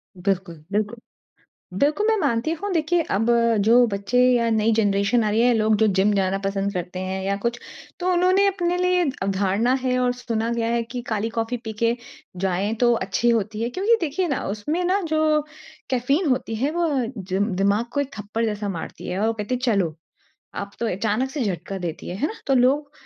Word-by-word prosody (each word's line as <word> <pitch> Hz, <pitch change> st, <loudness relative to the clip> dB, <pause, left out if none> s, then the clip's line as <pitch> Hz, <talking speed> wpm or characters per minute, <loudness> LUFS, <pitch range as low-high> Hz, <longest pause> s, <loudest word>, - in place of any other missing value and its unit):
बिल्कुल, 180 Hz, -4 st, -2 dB
बिल्कुल। 210 Hz, +3 st, -1 dB, 0.8 s
बिल्कुल 310 Hz, +10 st, +2 dB
मैं 445 Hz, -, +4 dB
मानती 280 Hz, 0 st, 0 dB
हूँ 390 Hz, +5 st, -3 dB
देखिए 335 Hz, +1 st, +2 dB
अब 220 Hz, -, +1 dB, 0.4 s
जो 240 Hz, +2 st, +6 dB
बच्चे 200 Hz, +4 st, -2 dB, 0.2 s
या 235 Hz, -1 st, +2 dB
नई 220 Hz, +1 st, +2 dB
जनरेशन 200 Hz, +3 st, +2 dB
आ 210 Hz, -, +1 dB
रही 220 Hz, +2 st, +2 dB
है 245 Hz, 0 st, +4 dB
लोग 215 Hz, -1 st, +3 dB
जो 220 Hz, -, +4 dB
जिम 205 Hz, +2 st, +4 dB
जाना 195 Hz, -1 st, +1 dB
पसंद 195 Hz, 0 st, -1 dB
करते 180 Hz, +1 st, -4 dB
हैं 190 Hz, 0 st, -3 dB
या 200 Hz, 0 st, +1 dB
कुछ। 235 Hz, 0 st, -1 dB, 0.4 s
तो 365 Hz, +1 st, +1 dB
उन्होंने 370 Hz, +3 st, +4 dB
अपने 355 Hz, -2 st, 0 dB
लिए 360 Hz, 0 st, +2 dB, 0.2 s
अवधारणा 200 Hz, +5 st, +1 dB
है 255 Hz, -1 st, +1 dB
और 250 Hz, 0 st, +2 dB
सुना 230 Hz, -2 st, -2 dB
गया 230 Hz, -1 st, -1 dB
है 235 Hz, -1 st, +1 dB
कि 245 Hz, +1 st, -6 dB
काली 220 Hz, +1 st, -1 dB
कॉफ़ी 230 Hz, +2 st, -1 dB
पी 220 Hz, -1 st, -5 dB
के 230 Hz, +1 st, +3 dB, 0.4 s
जाएँ 190 Hz, +3 st, 0 dB
तो 240 Hz, -, +5 dB, 0.2 s
अच्छी 240 Hz, +5 st, +1 dB
होती 220 Hz, -1 st, 0 dB
है। 235 Hz, -, 0 dB
क्योंकि 405 Hz, -, +2 dB
देखिए 335 Hz, +4 st, -1 dB
न -, -, 0 dB
उसमें 300 Hz, -, -2 dB
न 400 Hz, +1 st, +2 dB
जो 310 Hz, -1 st, +2 dB, 0.5 s
कैफ़ीन 275 Hz, +7 st, +1 dB
होती 240 Hz, -3 st, 0 dB
है 275 Hz, +7 st, 0 dB
वो 340 Hz, 0 st, 0 dB, 0.3 s
जिम 195 Hz, +2 st, -1 dB
दिमाग 205 Hz, +4 st, +2 dB
को 285 Hz, -, 0 dB
एक 275 Hz, -, -4 dB
थप्पड़ 210 Hz, +3 st, -2 dB
जैसा 210 Hz, -1 st, -2 dB
मारती 165 Hz, -4 st, -6 dB
है 180 Hz, +2 st, -2 dB
और 220 Hz, -, +2 dB
वो 225 Hz, -, +1 dB
कहती 220 Hz, +3 st, -3 dB
है -, -, -4 dB
चलो। 175 Hz, -7 st, 0 dB, 0.6 s
अब 200 Hz, 0 st, -5 dB
तो 235 Hz, -, 0 dB
अचानक 225 Hz, +6 st, 0 dB
से 265 Hz, -2 st, -2 dB
झटका 195 Hz, 0 st, -3 dB
देती 170 Hz, -3 st, -5 dB
है, 180 Hz, -, -4 dB
है 290 Hz, +9 st, 0 dB
ना? -, -, -6 dB
तो 270 Hz, -, +3 dB
लोग 280 Hz, +4 st, +2 dB
230 Hz, 205 wpm, -23 LUFS, 200-280 Hz, 0.8 s, जो